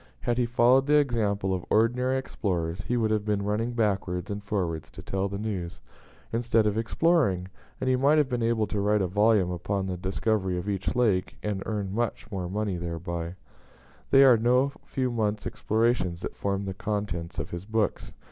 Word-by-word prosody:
Had 120 Hz, 0 st, 0 dB
he 120 Hz, -, +2 dB
followed 125 Hz, +3 st, +4 dB
the 150 Hz, -, +4 dB
example 105 Hz, -8 st, +1 dB
of 90 Hz, -2 st, -2 dB
ordinary 125 Hz, +4 st, +2 dB
explorers, 90 Hz, -9 st, -2 dB
he 125 Hz, -, +1 dB
would 110 Hz, -2 st, +1 dB
have 105 Hz, -1 st, +1 dB
been 105 Hz, -1 st, 0 dB
running 110 Hz, +4 st, -1 dB
backwards 100 Hz, -4 st, -1 dB
and 100 Hz, 0 st, -4 dB
forwards 85 Hz, -7 st, -2 dB
to -, -, -11 dB
tell 95 Hz, 0 st, -2 dB
the 100 Hz, -, -4 dB
news, 100 Hz, -5 st, -4 dB, 0.5 s
instead 115 Hz, -1 st, +2 dB
of 105 Hz, -1 st, +1 dB
exploring; 115 Hz, -, +1 dB, 0.3 s
and 130 Hz, -, -2 dB
he 130 Hz, -, +4 dB
might 140 Hz, +4 st, +4 dB
have 150 Hz, -3 st, +3 dB
been 125 Hz, -2 st, -2 dB
able 115 Hz, -1 st, +2 dB
to 105 Hz, -, -3 dB
write 105 Hz, 0 st, +2 dB
a -, -, 0 dB
volume 105 Hz, -1 st, +3 dB
upon 95 Hz, +2 st, -2 dB
the 95 Hz, -1 st, -3 dB
discovery 95 Hz, 0 st, -1 dB
of 90 Hz, +3 st, -4 dB
each 100 Hz, +2 st, -2 dB
lake, 105 Hz, -7 st, +1 dB
and 105 Hz, -2 st, -2 dB
earn 100 Hz, -3 st, -2 dB
much 110 Hz, -1 st, -2 dB
money 95 Hz, +1 st, -2 dB
thereby. 85 Hz, 0 st, -4 dB, 0.7 s
They 135 Hz, -, +7 dB
are 130 Hz, -3 st, +7 dB
no 125 Hz, +4 st, +3 dB
few 130 Hz, -2 st, -1 dB
months' 105 Hz, -3 st, -1 dB
explorations 110 Hz, -6 st, 0 dB
that -, -, -5 dB
form 100 Hz, 0 st, -2 dB
the 95 Hz, -, -3 dB
contents 100 Hz, -4 st, -3 dB
of 75 Hz, +2 st, -4 dB
his 85 Hz, +2 st, -6 dB
books. 110 Hz, 0 st, -1 dB
105 Hz, 185 wpm, -27 LUFS, 95-115 Hz, 0.7 s, They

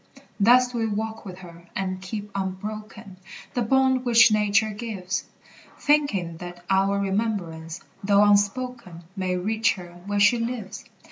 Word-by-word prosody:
Thus 245 Hz, +4 st, +5 dB
do 240 Hz, -, -3 dB
we 225 Hz, -, 0 dB
walk 220 Hz, +1 st, -4 dB
with 185 Hz, -2 st, -8 dB
her, 170 Hz, 0 st, -14 dB
and 185 Hz, -1 st, -3 dB
keep 205 Hz, +2 st, -6 dB
unbroken 200 Hz, +1 st, -6 dB, 0.4 s
The 245 Hz, -, 0 dB
bond 260 Hz, +2 st, +2 dB
which 230 Hz, -2 st, +6 dB
nature 210 Hz, 0 st, +2 dB
gives, 205 Hz, -3 st, -4 dB, 0.5 s
Thinking 215 Hz, -, +1 dB
that 175 Hz, 0 st, -9 dB
our 195 Hz, +1 st, +3 dB
remembrance, 190 Hz, -5 st, -2 dB, 0.2 s
though 200 Hz, +1 st, +5 dB
unspoken, 205 Hz, -2 st, 0 dB
May 185 Hz, -2 st, -1 dB
reach 220 Hz, +4 st, +1 dB
her 175 Hz, -2 st, -11 dB
where 205 Hz, 0 st, 0 dB
she 220 Hz, +4 st, +5 dB
lives. 230 Hz, -4 st, -5 dB
205 Hz, 140 wpm, -25 LUFS, 185-225 Hz, 0.5 s, which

